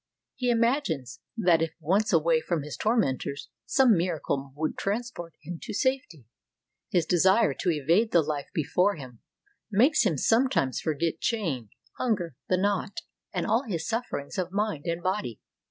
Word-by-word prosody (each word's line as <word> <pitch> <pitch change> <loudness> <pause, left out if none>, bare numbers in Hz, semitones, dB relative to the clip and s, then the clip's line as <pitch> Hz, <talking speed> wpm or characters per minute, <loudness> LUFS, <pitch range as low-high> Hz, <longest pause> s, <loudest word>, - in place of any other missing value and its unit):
He 250 -1 -1
imagines 230 - 0 0.2
that 175 -6 +4
if 165 -1 -2
once 195 +7 +1
away 165 -2 +3
from 165 -4 -2
his 150 -1 -6
tormentors 145 - 0 0.2
some 255 -5 +5
miracle 160 -6 -1
would 155 +1 -2
transport 200 -5 -4
him 175 -1 -6
to 215 - -6
safety. 260 - -1 0.6
His 175 -3 +2
desire 190 +6 +4
to 180 - 0
evade 170 - +2
the 170 -2 +5
Hfe 145 -2 -3
before 180 +7 +1
him 130 -6 -10 0.5
makes 260 +8 +4
him 180 -9 +1
sometimes 225 - +2
forget 160 +1 -1
chain, 160 - -1 0.3
hunger, 190 - -1
the 185 - +3
knout, 200 +1 -1 0.3
and - - -2
all 225 +4 +2
his 170 -7 -3
sufferings 220 - -3
of 180 -1 -2
mind 205 -7 -1
and 170 +1 -2
body. 185 - -2
175 Hz, 155 wpm, -27 LUFS, 155-220 Hz, 0.6 s, some